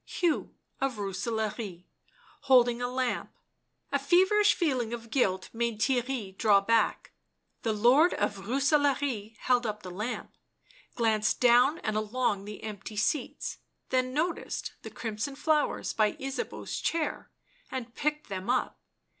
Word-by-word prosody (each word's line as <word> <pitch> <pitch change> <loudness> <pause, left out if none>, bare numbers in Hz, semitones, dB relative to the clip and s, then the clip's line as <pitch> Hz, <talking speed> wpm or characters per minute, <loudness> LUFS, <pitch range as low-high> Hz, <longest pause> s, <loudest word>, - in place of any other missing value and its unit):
Hugh 345 -3 -1 0.2
of 270 -2 0
Rooselaare 205 -1 -3 0.7
holding 245 -2 +5
a 245 - 0
lamp. 250 0 -2 0.6
A 280 - +2
feverish 375 +8 +4
feeling 255 -9 0
of 230 -1 -7
guilt 190 -8 +1
made 230 -1 -1
Theirry 245 -5 0
draw 205 -3 +5
back; 225 +3 +1 0.5
the 225 - 0
Lord 250 +11 +5
of 200 -1 -2
Rooselaare 270 -4 +1
held 245 0 +1
up 210 0 -4
the 185 - -7
lamp, 210 +7 -5 0.6
glanced 215 -2 +1
down 250 +5 +5
and 215 -1 -1
along 215 -2 0
the 210 0 -8
empty 210 0 -7
seats, 305 - -1 0.3
then 255 0 +1
noticed 320 +6 -2
the - - -8
crimson 225 +4 -4
flowers 305 +1 0
by 215 -1 +2
Ysabeau's 270 +1 -4
chair 325 -2 -2 0.4
and 245 -2 -5
picked 300 +2 -2
them 190 +1 -5
up. 255 0 0
240 Hz, 130 wpm, -29 LUFS, 215-270 Hz, 0.7 s, holding